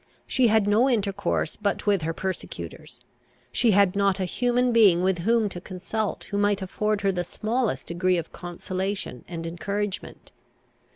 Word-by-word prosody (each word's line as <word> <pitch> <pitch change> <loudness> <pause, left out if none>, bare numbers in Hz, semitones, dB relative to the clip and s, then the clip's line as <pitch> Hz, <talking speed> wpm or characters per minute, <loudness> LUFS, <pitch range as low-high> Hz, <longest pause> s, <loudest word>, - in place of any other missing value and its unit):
She 255 -2 +3
had 220 -2 +4
no 225 +6 +4
intercourse 200 -4 0
but 205 -2 -2
with 200 -4 +3
her 160 +1 -1
persecutors. 190 +3 -6 0.5
She 240 - +2
had 200 -2 +4
not 200 -1 +2
a 190 - 0
human 245 +5 +1
being 200 -7 +5
with 190 -1 +1
whom 225 +4 +2
to 175 -2 -7
consult, 195 +4 -3
who 200 - 0
might 205 -1 +2
afford 210 +2 -1
her 195 -1 +2
the 180 -2 -2
smallest 225 +6 -2
degree 180 +1 +1
of 165 - -4
consolation 185 - -4
and 165 -1 -6
encouragement. 195 +5 -4
200 Hz, 160 wpm, -25 LUFS, 180-215 Hz, 0.5 s, being